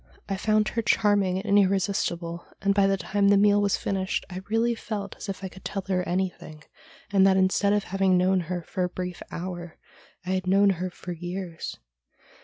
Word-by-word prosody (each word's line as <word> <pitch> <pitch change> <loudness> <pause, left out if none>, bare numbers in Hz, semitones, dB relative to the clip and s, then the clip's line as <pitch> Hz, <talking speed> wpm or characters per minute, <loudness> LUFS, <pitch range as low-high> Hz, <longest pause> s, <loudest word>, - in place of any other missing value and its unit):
I 195 - -1
found 215 +2 +2
hex 230 -2 +1
charming 200 -3 +2
and 205 -1 +4
irresistible, 185 -3 0
and 200 0 +2
by 200 -1 +4
the 195 0 +2
time 200 +1 +1
the 200 0 +6
meal 205 0 +4
was 200 -1 +2
finished 190 -1 -2
I 185 +1 -5
really 230 +2 +2
felt 210 -3 -5
as - - -7
if 195 0 -5
I - - -2
could 190 +1 -13
tell 195 -2 -3
her 185 -1 +2
anything, 175 -4 -3 0.5
and 195 - +5
that, 190 -1 +4
instead 190 +2 +3
of 205 -1 +1
having 190 -1 +2
known 185 +1 +3
her 175 -2 -2
for 185 - -3
a 180 - 0
brief 180 -1 -5
hour, 175 -1 -6 0.5
I 185 - -2
had 185 0 -1
known 195 +1 +5
her 185 0 -3
for 180 0 -8
years. 175 0 -5
190 Hz, 200 wpm, -26 LUFS, 180-200 Hz, 0.5 s, the